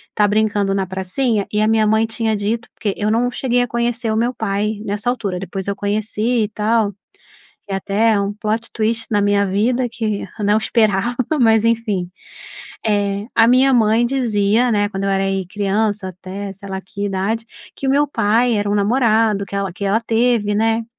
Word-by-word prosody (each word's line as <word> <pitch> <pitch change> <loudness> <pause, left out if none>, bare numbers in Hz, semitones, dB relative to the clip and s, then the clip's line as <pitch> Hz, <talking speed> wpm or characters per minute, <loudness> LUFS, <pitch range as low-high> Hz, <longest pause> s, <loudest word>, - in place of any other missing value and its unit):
tá 210 -1 +3
brincando 205 -2 +1
na 195 -1 0
pracinha 195 +4 -1
e 210 - 0
a 215 - +3
minha 220 -1 +3
mãe 220 +1 +3
tinha 225 -1 -1
dito 220 +3 -2
porque 205 -4 -2
eu 210 0 0
não 240 +2 +2
cheguei 245 -1 0
a - - -3
conhecer 235 -1 -1
o 220 - 0
meu 240 +3 +1
pai 210 -1 -2
nessa 210 +4 -1
altura, 200 -7 -2
depois 195 0 -6
eu 200 - -1
conheci 215 +3 -1
e - - -7
tal. 215 -1 0 0.8
É 195 - -1
até 210 +3 +1
um 200 +1 -2
plot 215 +2 -2
twist 225 +1 0
na 205 -1 +2
minha 200 0 +2
vida 240 +6 +1
que 215 -3 -3 0.2
eu 210 - -1
não 205 +1 +3
esperava, 220 0 +1 0.3
mas 225 -2 +4
enfim. 225 -5 0 0.8
Eh, 205 -1 0
a 225 - +5
minha 260 +2 +4
mãe 225 0 +3
dizia, 235 -2 +1
né, 205 -1 +1
quando 195 -1 -5
eu 195 - 0
era 195 0 +1
aí, 195 -1 -1
criança 205 0 -1
até 190 +2 -7
sei 200 +1 -11
lá 190 0 -4
que 200 +2 -5
idade, 200 +4 -2 0.3
que 270 - -4
o - - +3
meu 290 +2 +3
pai 230 -1 +2
era 205 0 -1
um - - +1
namorado 215 -1 +2
que 195 - -10
ela 195 -2 -2
que 200 - -6
ela 200 +3 +2
teve, 230 -2 +1
né, 225 +2 +1
215 Hz, 195 wpm, -19 LUFS, 200-230 Hz, 0.8 s, a